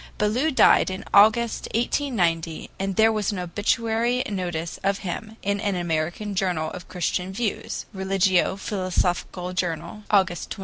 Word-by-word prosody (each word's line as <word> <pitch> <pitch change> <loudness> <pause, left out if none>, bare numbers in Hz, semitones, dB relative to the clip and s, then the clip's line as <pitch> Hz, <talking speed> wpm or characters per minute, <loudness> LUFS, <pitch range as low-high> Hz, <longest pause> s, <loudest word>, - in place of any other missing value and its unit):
Ballou 230 +9 +1
died 265 - +5
in 185 +1 -6
August, 220 +3 +5
1890, 175 - 0
and 195 0 -2
there 220 +2 +5
was 215 -2 0
as 205 - -4
obituary 225 +7 0
notice 175 -5 -3
of 195 0 +1
him 215 +5 -5
in 200 0 0
an 205 -2 -1
American 175 +4 -2
journal 180 -5 -1
of 180 - -9
Christian 180 +1 -2
views 210 +1 -3
(RELIGIO 190 -1 +2
PHILOSOPHICAL 185 -2 -2
JOURNAL, 180 +4 -3
August 190 -4 +2
23). - - -6
195 Hz, 140 wpm, -24 LUFS, 180-215 Hz, -, died